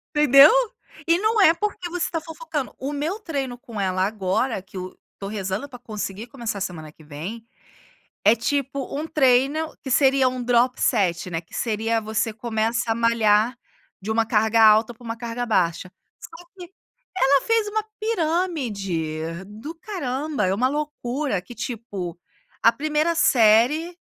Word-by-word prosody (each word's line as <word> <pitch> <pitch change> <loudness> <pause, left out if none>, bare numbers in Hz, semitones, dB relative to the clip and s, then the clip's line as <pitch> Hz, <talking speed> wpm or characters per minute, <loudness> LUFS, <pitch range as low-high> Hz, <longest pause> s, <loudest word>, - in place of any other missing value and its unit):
Entendeu? 285 -1 +8 0.6
E 335 +1 +4
não 435 +1 +2
é 330 -4 +7
porque 360 -1 -3
você 350 0 -1
está 330 -2 -3
fofocando, 320 -3 -5
o 275 +2 -4
meu 310 +8 -2
treino 275 - -4
com 230 -3 -9
ela 185 -1 +1
agora 205 +2 -1
que 190 +1 -12
o 185 0 -7 0.2
tô 195 - -5
rezando 200 +4 -3
para 250 -2 -11
conseguir 215 -2 -6
começar 235 -4 -5
a - - -9
semana 160 -5 -5
que 155 - -19
vem, 165 +10 -7 0.8
é 215 +3 +6
tipo, 275 +3 -2
um 310 +2 -3
treino 280 +3 +2
que 265 - -7
seria 270 0 +4
um 250 -1 -5
drop 245 +1 +2
set, 185 -6 +1
né, 165 -1 -2
que 175 - -26
seria, 225 0 0
você 220 +1 -1
começa 225 +1 -1
a - - +1
malhar 230 +1 +2 0.4
de 210 +3 -3
uma 225 0 +2
carga 220 +1 +2
alta 220 +2 +5
para 235 - -19
uma 230 0 -5
carga 235 +1 -4
baixa, 185 -4 0 0.3
só 330 +2 -12
que 355 -1 -10 0.5
ela 280 -5 +4
fez 455 -2 +2
uma 430 +1 -1 0.2
pirâmide 205 - -2
do 220 +11 -9
caramba, 300 - -3
é 185 - +1
uma 250 +6 +2
loucura 285 -6 -2
que, 240 - -12
tipo, 205 -8 -6 0.4
a 230 - +6
primeira 310 +4 0
série, 265 +7 +3
240 Hz, 160 wpm, -23 LUFS, 210-300 Hz, 0.8 s, Entendeu